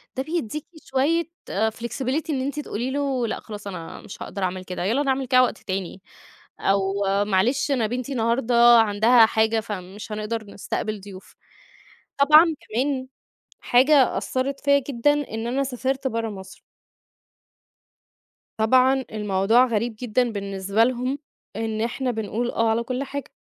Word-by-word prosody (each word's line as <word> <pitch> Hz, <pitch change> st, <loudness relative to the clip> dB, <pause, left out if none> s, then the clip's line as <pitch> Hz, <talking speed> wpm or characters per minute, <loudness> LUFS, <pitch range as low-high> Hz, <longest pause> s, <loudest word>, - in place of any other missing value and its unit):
ده 265 Hz, -, -2 dB
بيديكِ 305 Hz, -2 st, -3 dB, 0.2 s
شوية 290 Hz, +6 st, +1 dB, 0.3 s
آآ 220 Hz, +3 st, +1 dB
flexibility 255 Hz, +7 st, -3 dB
إن 275 Hz, -4 st, 0 dB
أنتِ 280 Hz, +3 st, -3 dB
تقولي 250 Hz, -2 st, -3 dB
له 270 Hz, -3 st, -1 dB
لأ -, -, -3 dB
خلاص 210 Hz, -2 st, -9 dB
أنا 180 Hz, -4 st, -7 dB
مش -, -, -11 dB
هأقدر 195 Hz, -, -5 dB
أعمل 185 Hz, 0 st, -2 dB
كده، 180 Hz, -1 st, -5 dB
يالّا 235 Hz, +10 st, +1 dB
نعمل 265 Hz, -1 st, 0 dB
كده 255 Hz, 0 st, +5 dB
وقت 240 Hz, -, -1 dB
تاني. 190 Hz, 0 st, -5 dB, 0.6 s
أو 195 Hz, 0 st, +1 dB, 0.3 s
معلش 225 Hz, +9 st, +1 dB
أنا 235 Hz, -5 st, +1 dB
بنتي 250 Hz, +3 st, -4 dB
النهارده 235 Hz, 0 st, 0 dB, 0.2 s
عندها 225 Hz, +2 st, +5 dB
حاجة 220 Hz, 0 st, +1 dB
فمش 205 Hz, 0 st, -7 dB
هنقدر 215 Hz, +1 st, -3 dB
نستقبل 215 Hz, +1 st, -4 dB
ضيوف. 190 Hz, -1 st, -12 dB, 0.8 s
طبعًا 305 Hz, +4 st, +8 dB, 0.2 s
كمان 260 Hz, +3 st, -2 dB, 0.5 s
حاجة 265 Hz, +2 st, +4 dB
أثّرِت 270 Hz, +2 st, -2 dB
فيّا 280 Hz, -1 st, +3 dB
جدًا 275 Hz, +2 st, +2 dB
إن 235 Hz, -6 st, -3 dB
أنا 265 Hz, +3 st, 0 dB
سافرت 265 Hz, +1 st, -2 dB
برّه 230 Hz, -2 st, -2 dB
مصر. 190 Hz, -2 st, -10 dB, 2.0 s
طبعًا 255 Hz, +4 st, +3 dB
الموضوع 210 Hz, +3 st, +3 dB
غريب 230 Hz, -1 st, -1 dB
جدًا 245 Hz, 0 st, 0 dB
بالنسبة 200 Hz, +1 st, 0 dB
لهم 255 Hz, +3 st, -1 dB, 0.4 s
إن 220 Hz, 0 st, -2 dB
إحنا 250 Hz, +2 st, -1 dB
بنقول 225 Hz, +2 st, -3 dB
آه 230 Hz, 0 st, +1 dB
على 225 Hz, +1 st, +1 dB
كل 255 Hz, +3 st, -3 dB
حاجة. 280 Hz, 0 st, -6 dB
235 Hz, 145 wpm, -23 LUFS, 210-265 Hz, 2.0 s, طبعًا